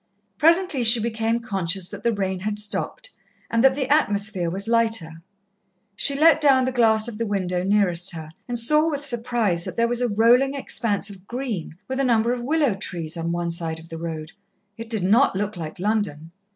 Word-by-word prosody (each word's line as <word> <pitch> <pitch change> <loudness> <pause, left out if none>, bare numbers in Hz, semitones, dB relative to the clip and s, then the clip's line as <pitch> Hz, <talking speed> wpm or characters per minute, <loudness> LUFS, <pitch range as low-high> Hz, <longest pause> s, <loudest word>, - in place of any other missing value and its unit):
Presently 335 -4 +3
she 230 +1 +7
became 225 +1 -2
conscious 190 -5 -1
that - - -9
the 235 - +1
rain 190 -3 -3
had 210 +2 -4
stopped, 210 - -2 0.4
and 230 +1 +1
that 265 0 +4
the 270 -2 -2
atmosphere 205 - +1
was 195 +4 -2
lighter. 225 -9 0 0.7
She 280 +6 +2
let 315 -1 +5
down 270 -3 +4
the 260 - -1
glass 225 -3 +3
of 230 -2 -8
the 230 - -1
window 185 -3 -2
nearest 190 -2 +2
her, 155 -1 -9 0.2
and 245 -1 -3
saw, 300 +7 +3
with 290 -2 -3
surprise, 235 -8 -1
that - - -7
there 230 0 +2
was 240 +1 -1
a 245 - 0
rolling 240 +6 +3
expanse 210 -6 0
of 195 -1 -14
green, 235 - -5
with 260 +1 -4
a - - +1
number 235 -1 +1
of 245 - -5
willow 285 -1 +1
trees, 175 -5 -5
on 165 0 -3
one 170 0 -2
side 165 -1 -3
of 165 +1 -15
the 165 -1 -8
road. 160 -1 -6 0.4
It 225 +1 -9
did 220 -5 -1
not 220 +5 +3
look 205 +2 -3
like 160 -3 -7
London. 185 -6 -2
220 Hz, 200 wpm, -22 LUFS, 180-245 Hz, 0.7 s, she